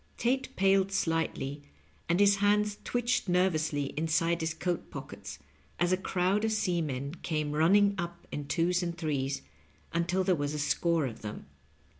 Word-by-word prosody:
Tate 265 +3 0
paled 195 0 +3
slightly, 165 -5 -1 0.5
and 170 +2 +3
his 200 0 +5
hands 210 +1 +2
twitched 245 -4 0
nervously 155 -6 +1
inside 165 +2 +1
his 160 0 0
coat 175 +2 -3
pockets, - - -8 0.4
as 175 +1 +2
a - - +5
crowd 190 +2 0
of 220 - +1
seamen 160 -10 -1
came 155 -3 -1
run 160 +5 +3
ning 205 0 +5
up 175 0 -5
in 145 -1 -4
twos 175 +3 +1
and 170 -1 -3
threes, 140 -4 -2 0.5
until 175 +3 +1
there 185 0 +3
was 145 -2 -1
a - - -2
score 160 +2 +1
of 120 -4 -6
them. 105 -1 -7
170 Hz, 160 wpm, -30 LUFS, 155-195 Hz, 0.5 s, his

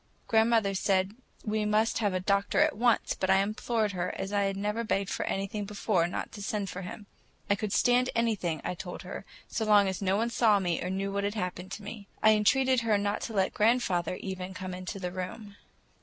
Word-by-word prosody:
Grandmother 225 -3 +3
said 190 0 +1 0.3
we 215 0 0
must 215 +2 +2
have 205 -3 +1
the 185 - 0
doctor 200 +5 +1
at 305 +1 +4
once, 240 +1 +2
but 190 - -2
I 190 - +6
implored 215 +2 0
her, 180 -1 -2
as 195 +1 -4
I 200 -1 +2
had 195 0 -1
never 210 +3 -1
begged 195 -3 -1
for - - -2
anything 195 +2 -2
before, 200 -3 0
not 175 - -4
to 205 - -9
send 200 -1 -2
for 180 - -6
him. 200 +3 -8 0.5
I - - +5
could 205 0 -4
stand 245 +3 +3
anything, 205 -10 0
I - - -2
told 180 0 -7
her, - - -7 0.2
so 225 - -2
long 205 -2 +5
as 190 0 -3
nobody 200 +5 +1
saw 220 -3 +4
me 175 -4 -1
or 180 - -2
knew 195 +1 -2
what 200 0 -1
had 205 +1 -1
happened 180 -2 -4
to 210 - -7
me. 205 -1 -8 0.2
I 220 - +8
entreated 255 +4 +3
her 220 -3 +2
not 205 0 -1
to 225 - -5
let 190 -2 +1
grandfather, 210 -6 +2
even, 185 0 -6
come 185 0 -5
into 185 +2 -6
my 180 - -3
room. 190 +3 -7
200 Hz, 215 wpm, -29 LUFS, 190-220 Hz, 0.5 s, I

